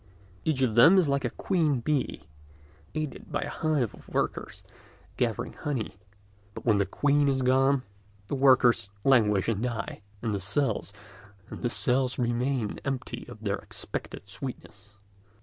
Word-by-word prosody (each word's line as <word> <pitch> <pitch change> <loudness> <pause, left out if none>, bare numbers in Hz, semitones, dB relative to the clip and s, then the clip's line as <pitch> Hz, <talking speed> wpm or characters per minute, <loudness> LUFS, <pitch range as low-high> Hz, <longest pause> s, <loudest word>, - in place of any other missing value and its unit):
Each 145 -4 +1
of 120 -4 +2
them 165 - +7
is 180 -5 +4
like 140 -1 +1
a - - +1
queen 155 - +1
bee, 135 - -1 0.7
aided 155 -2 -4
by - - -1
a - - -4
hive 150 -8 0
of - - -15
workers - - -2 0.5
gathering - - -1
honey; 120 -9 -4 0.6
but - - -8
when 110 -4 +4
the 100 -1 +1
queen 145 +7 +2
is 135 -1 +1
gone 135 +1 +3 0.4
the 105 - -6
workers 130 -5 +4
languish 105 -7 +4
and 110 -3 0
die, 115 -4 -3 0.2
and 110 -2 0
the 100 - -1
cells 100 +4 0 1.3
remain 120 -1 -1
empty 130 -3 -4
of 110 - -11
their 100 -1 0
expected 100 - -7
sweetness. 100 -3 -8
125 Hz, 140 wpm, -28 LUFS, 110-140 Hz, 1.3 s, them